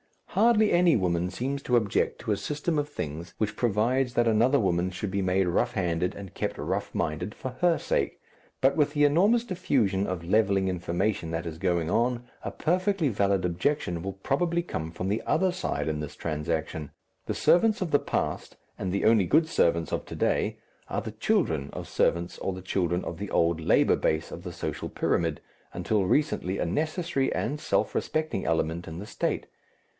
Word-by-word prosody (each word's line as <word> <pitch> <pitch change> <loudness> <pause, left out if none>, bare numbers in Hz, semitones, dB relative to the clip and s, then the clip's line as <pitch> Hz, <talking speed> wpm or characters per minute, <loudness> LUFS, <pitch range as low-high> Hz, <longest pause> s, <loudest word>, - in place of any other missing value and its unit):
Hardly 220 -2 +4
any 175 -2 +5
woman 90 -3 +1
seems 135 +9 -3
to 125 - +1
object 110 -4 +1
to - - -3
a 105 - +2
system 150 - -1
of 145 0 -2
things 85 - -6
which 105 0 -2
provides 120 +3 +1
that 120 -1 +3
another 120 +6 +4
woman 90 -3 +1
should 95 +2 -4
be 100 0 0
made 95 0 +2
rough 90 - +1
handed 90 -1 0
and 95 -3 -9
kept - - -3
rough 95 +6 -3
minded 85 +5 -2
for 130 - -5
her 175 -2 +4
sake, - - -1 0.4
but 135 +1 +4
with 150 -2 +2
the 145 -1 +2
enormous 195 +11 +4
diffusion 130 - 0
of 90 -2 -3
levelling 95 0 +2
information 90 +1 -1
that 80 +1 -3
is 80 -1 -5
going 85 -3 0
on, 120 +2 +1 0.2
a - - -2
perfectly 180 -1 +1
valid 100 -3 +1
objection 90 - -1
will 95 +2 -4
probably 165 - 0
come 80 - -4
from 85 +2 -4
the 105 +3 0
other 185 -1 +2
side 180 - -2
in 75 -1 -2
this 75 -1 -6
transaction. 80 -1 -3 0.4
The - - -1
servants 215 +4 +4
of 175 -4 -1
the 145 - +5
past - - -3 0.2
and 95 - -2
the 100 - 0
only 110 -3 +5
good 155 - +3
servants 85 - +1
of - - -2
to - - -8
day - - 0 0.3
are - - -2
the 110 - -6
children 105 - 0
of - - -6
servants 85 +1 0
or 95 - -2
the 95 0 -8
children 90 -1 0
of 85 - -6
the 105 - -4
old 85 0 +2
labour 80 - +3
base 80 +1 0
of 85 - -8
the 90 -2 -6
social - - -4
pyramid, 80 -4 0 0.3
until 105 -3 0
recently 100 - +1
a - - 0
necessary 155 - -1
and 145 +6 -2
self - - 0
respecting 155 -11 -1
element 80 +1 0
in 80 0 -6
the 100 - -6
State. - - -2
100 Hz, 190 wpm, -27 LUFS, 85-145 Hz, 0.4 s, any